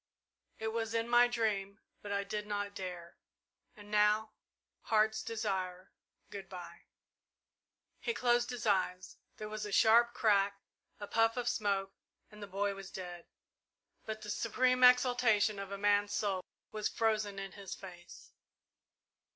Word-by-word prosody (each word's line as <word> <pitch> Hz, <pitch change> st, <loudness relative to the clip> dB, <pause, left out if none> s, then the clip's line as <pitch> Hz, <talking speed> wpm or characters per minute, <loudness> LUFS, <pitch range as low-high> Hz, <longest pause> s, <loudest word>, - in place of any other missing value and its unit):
"It 220 Hz, -, -3 dB
was 225 Hz, 0 st, -3 dB
in 230 Hz, 0 st, 0 dB
my 240 Hz, 0 st, +6 dB
dream 215 Hz, -4 st, -1 dB, 0.2 s
but 205 Hz, -, -7 dB
I 200 Hz, 0 st, 0 dB
did 210 Hz, +1 st, -4 dB
not 205 Hz, -1 st, -3 dB
dare 180 Hz, -3 st, -7 dB, 0.6 s
and 210 Hz, 0 st, -13 dB
now 210 Hz, +1 st, +3 dB, 0.5 s
Heart's 220 Hz, 0 st, +2 dB
Desire 190 Hz, -4 st, -3 dB, 0.4 s
good 195 Hz, -1 st, -8 dB
bye!" 175 Hz, -2 st, -10 dB, 1.1 s
He 455 Hz, -, -2 dB
closed 240 Hz, 0 st, +2 dB
his 245 Hz, -2 st, -5 dB
eyes. 185 Hz, -2 st, 0 dB, 0.2 s
There 215 Hz, -, -6 dB
was 215 Hz, 0 st, -5 dB
a 205 Hz, -, -5 dB
sharp 235 Hz, +3 st, +5 dB
crack, 200 Hz, -2 st, +2 dB, 0.4 s
a 205 Hz, -, -5 dB
puff 225 Hz, +3 st, +2 dB
of 245 Hz, -1 st, -2 dB
smoke, 200 Hz, -4 st, 0 dB, 0.4 s
and 210 Hz, 0 st, -13 dB
the 205 Hz, -, -6 dB
boy 200 Hz, +1 st, -1 dB
was 195 Hz, -1 st, -9 dB
dead; 175 Hz, -2 st, -8 dB, 0.8 s
but 215 Hz, -1 st, -6 dB
the 210 Hz, -, -4 dB
supreme 255 Hz, +3 st, +1 dB
exaltation 245 Hz, -5 st, +5 dB
of 195 Hz, 0 st, -6 dB
a 200 Hz, -, -4 dB
man's 205 Hz, 0 st, +2 dB
soul 195 Hz, -3 st, -1 dB, 0.3 s
was 215 Hz, -1 st, -2 dB
frozen 215 Hz, -3 st, 0 dB
in 195 Hz, -1 st, -5 dB
his 200 Hz, -2 st, -8 dB
face. 175 Hz, -2 st, -12 dB
210 Hz, 145 wpm, -33 LUFS, 195-225 Hz, 1.1 s, my